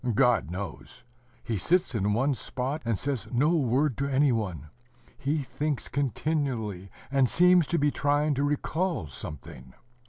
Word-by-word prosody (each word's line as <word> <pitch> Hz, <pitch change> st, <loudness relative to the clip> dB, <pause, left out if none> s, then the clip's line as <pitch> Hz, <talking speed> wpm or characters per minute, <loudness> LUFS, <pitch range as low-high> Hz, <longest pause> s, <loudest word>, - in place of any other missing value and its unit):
God 115 Hz, -, +3 dB
knows. 95 Hz, +3 st, -7 dB, 0.4 s
He 110 Hz, -4 st, -2 dB
sits 180 Hz, -, +1 dB
in 105 Hz, -2 st, +1 dB
one 135 Hz, +6 st, +2 dB
spot, 135 Hz, +4 st, -3 dB
and 115 Hz, -3 st, 0 dB
says 135 Hz, -4 st, -2 dB
no 145 Hz, +7 st, +3 dB
word 135 Hz, -1 st, +1 dB
to 140 Hz, +1 st, 0 dB
any 135 Hz, +1 st, +4 dB
one: 90 Hz, -, -3 dB, 0.4 s
he 145 Hz, +2 st, -1 dB
thinks 145 Hz, +1 st, -3 dB
continually, 130 Hz, -, -2 dB, 0.2 s
and 135 Hz, -3 st, +3 dB
seems 180 Hz, -2 st, +5 dB
to 170 Hz, -, 0 dB
be 145 Hz, -1 st, +2 dB
trying 145 Hz, +2 st, +1 dB
to 140 Hz, +1 st, 0 dB
recall 155 Hz, -, -1 dB
something. 65 Hz, -3 st, -9 dB
135 Hz, 150 wpm, -27 LUFS, 110-150 Hz, 0.4 s, seems